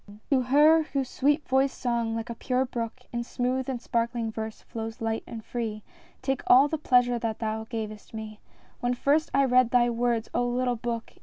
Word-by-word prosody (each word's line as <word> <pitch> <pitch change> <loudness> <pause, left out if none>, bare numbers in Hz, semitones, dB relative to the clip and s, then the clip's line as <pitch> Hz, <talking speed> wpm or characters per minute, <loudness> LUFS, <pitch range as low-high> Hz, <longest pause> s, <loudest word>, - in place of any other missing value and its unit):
P. 205 +1 -14
TO 265 -2 +4
her 295 +6 +5
whose 275 -4 -3
sweet 295 +3 +1
voiced 265 +1 +2
song 235 -2 0
like 225 +1 -4
a - - -3
pure 255 +2 0
brook 235 0 -5
In 235 0 -1
smooth 250 +2 -2
and 255 -2 -2
sparkling 235 -1 -1
verse 220 0 -6
flows 225 0 -6
light 225 0 -2
and 225 -2 -8
free, 220 -3 -4 0.4
Take 270 0 0
all 265 +3 +7
the 315 +1 -3
pleasure 245 -4 +3
that 225 -1 -2
thou 220 0 -3
gavest 215 -2 -6
me 215 -1 -7 0.4
When 245 0 0
first 290 +5 +2
I 275 0 +3
read 255 -2 +4
thy 240 -1 +3
words, 235 -1 0
O - - +1
little 245 0 0
book 230 0 -4
240 Hz, 200 wpm, -27 LUFS, 225-260 Hz, 0.4 s, all